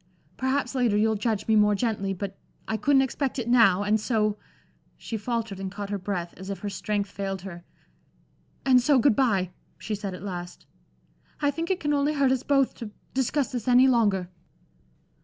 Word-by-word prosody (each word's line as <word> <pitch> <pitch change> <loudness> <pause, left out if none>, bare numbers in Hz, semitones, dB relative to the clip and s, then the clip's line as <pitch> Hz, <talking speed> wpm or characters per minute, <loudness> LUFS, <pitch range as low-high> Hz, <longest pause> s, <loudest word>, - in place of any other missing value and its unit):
Perhaps, 260 0 -1
later, 245 -6 +2
you'll 220 +1 +3
judge 215 -1 -1
me 220 - +3
more 210 -1 +4
gently; 200 -3 -1
but 195 +1 -5 0.3
I 220 - -1
couldn't 270 +3 +3
expect 265 +1 -2
it 240 -3 -3
now. 225 -6 +5
And 210 +1 +2
so" 215 -3 +1 0.6
she 230 - -6
faltered 220 -2 -3
and 190 -1 -4
caught 200 0 -6
her 200 - -2
breath, 180 -3 -4
as 190 +1 -8
if 195 -3 -5
her 205 - -4
strength 200 0 -2
failed 195 -2 -4
her 175 -3 -8 1.0
"and 255 -2 +6
so 275 +2 +4
good 255 -2 +4
bye," 195 -9 +1 0.3
she 220 - -5
said 200 -2 -4
at 180 - -10
last. 175 -3 -7 0.7
"I 290 -1 +2
think 330 +4 -4
it 380 - 0
can 295 0 0
only 285 +1 +1
hurt 275 -2 +3
us 260 -2 +1
both 275 -1 +2
to 230 - -6 0.2
discuss 265 +2 0
this 245 -3 -4
any 250 +1 +6
longer." 205 -8 +2
220 Hz, 190 wpm, -26 LUFS, 195-260 Hz, 1.0 s, and